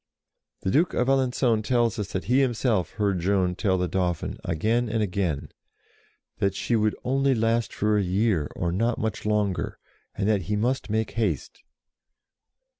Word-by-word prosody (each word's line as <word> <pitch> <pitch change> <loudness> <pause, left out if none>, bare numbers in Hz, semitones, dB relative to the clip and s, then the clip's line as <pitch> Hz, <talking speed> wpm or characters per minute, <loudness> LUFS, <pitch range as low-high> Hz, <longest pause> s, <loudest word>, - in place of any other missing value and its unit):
The 95 - -1
Duke 165 - +2
of 125 - +1
Alencon 125 -4 +2
tells 120 0 +1
us 100 -1 -4
that 95 - -2
he 125 +5 +2
himself 120 - 0
heard 100 -4 0
Joan 90 0 +1
tell 95 0 +1
the 90 0 0
Dauphin, 90 -3 -2
again 110 +9 0
and 110 0 0
again, 90 -7 -2 0.9
that 100 -1 +1
"she 120 - 0
would 110 -1 +2
only 135 +1 +2
last 115 0 +1
for 105 0 +1
a - - +1
year, 95 -4 +1
or 85 - -1
not 115 +6 0
much 110 -1 -3
longer, 105 -3 0 0.4
and 100 - -1
that 105 -3 +2
he 105 - +1
must 120 +1 -1
make 110 0 0
haste." 115 -2 -2
105 Hz, 165 wpm, -26 LUFS, 95-120 Hz, 0.9 s, Duke